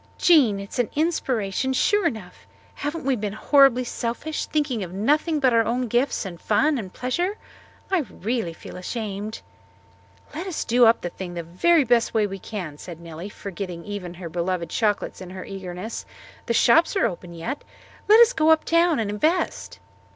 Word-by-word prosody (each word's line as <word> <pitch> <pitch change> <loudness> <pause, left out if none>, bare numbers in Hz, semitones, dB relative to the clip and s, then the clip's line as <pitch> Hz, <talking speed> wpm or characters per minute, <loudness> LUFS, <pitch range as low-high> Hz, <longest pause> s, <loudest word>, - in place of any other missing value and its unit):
"Jean, 265 - +5
it 200 0 -8
is - - -5
an 245 - +1
inspiration, 265 - 0
sure 410 +7 +3
enough. 215 - -7 0.3
Haven't 295 0 -4
we 270 -1 +2
been 210 -3 -3
horribly 260 +2 +4
selfish 245 +6 -3
thinking 290 -7 -1
of 175 - -7
nothing 295 - +1
but 260 -4 +3
our 230 0 +5
own 245 +2 -1
gifts 245 +1 0
and 175 -3 -8
fun 300 -2 +2
and 190 -5 -7
pleasure? 350 - -2 0.5
I 380 - +3
really 220 -2 -2
feel 160 - -10
ashamed." 210 +2 -5 0.9
"Let 335 +5 -5
us 360 - -3
do 240 +1 +5 0.2
the 175 - -3
thing 180 -1 -7
up 170 - -4
the 165 - -18
very 335 - +4
best 240 -2 +2
way 215 -1 +3
we 195 -1 -5
can," 175 -9 -6
said 170 -3 -9
Nellie, 170 +3 -8
forgetting 180 -4 -7
even 195 -4 -6
her 175 -1 -7
beloved 170 0 -2
chocolates 210 -3 -1
in 185 - -8
her 185 0 -8
eagerness. 190 +2 -6 0.4
"The 235 - +1
shops 325 - +4
are 385 - +3
open 175 -1 -5
yet. 235 - -5 0.4
Let 430 +2 +7
us 470 +1 +6
go 315 -8 +2
up 320 -1 +4
town 335 -1 +3
and 220 - -1
invest." 310 - -1
230 Hz, 180 wpm, -24 LUFS, 190-290 Hz, 0.9 s, Let